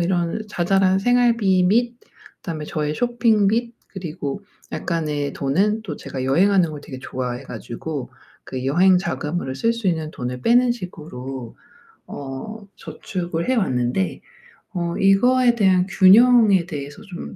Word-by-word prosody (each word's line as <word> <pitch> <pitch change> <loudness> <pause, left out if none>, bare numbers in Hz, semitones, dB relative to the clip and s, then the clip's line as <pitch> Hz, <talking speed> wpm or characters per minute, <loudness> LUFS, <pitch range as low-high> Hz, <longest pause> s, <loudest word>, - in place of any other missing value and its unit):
이런 175 +3 0
자잘한 190 0 +2
생활비 230 -5 +3
및 235 +5 +2 0.5
다음에 155 -3 -5
저의 150 0 -2
쇼핑 230 -1 +2
및 235 +2 -1
그리고 170 -2 -6 0.3
약간의 150 -4 -2
돈은 200 +11 0
또 165 -9 -6
제가 130 - -6
여행하는 175 +6 +3
걸 150 -1 -8
되게 130 -3 -9
좋아해 125 0 -4
가지고 135 +2 -6 0.3
그 130 -1 -6
여행 180 +7 +4
자금으로 170 -6 -3
쓸 230 +10 +1
수 230 -4 -2
있는 160 -3 -2
돈을 125 0 -5
빼는 245 +1 +4
식으로 135 - -7 0.5
어 145 +11 -7
저축을 175 -1 -5
해 260 - +3
왔는데 125 - 0 0.6
어 170 -1 -2
이거에 240 +5 +4
대한 190 -4 +3
균형에 200 -1 +5
대해서 145 -4 -7
좀 195 -5 -9
180 Hz, 275 characters per minute, -21 LUFS, 145-210 Hz, 0.6 s, 균형에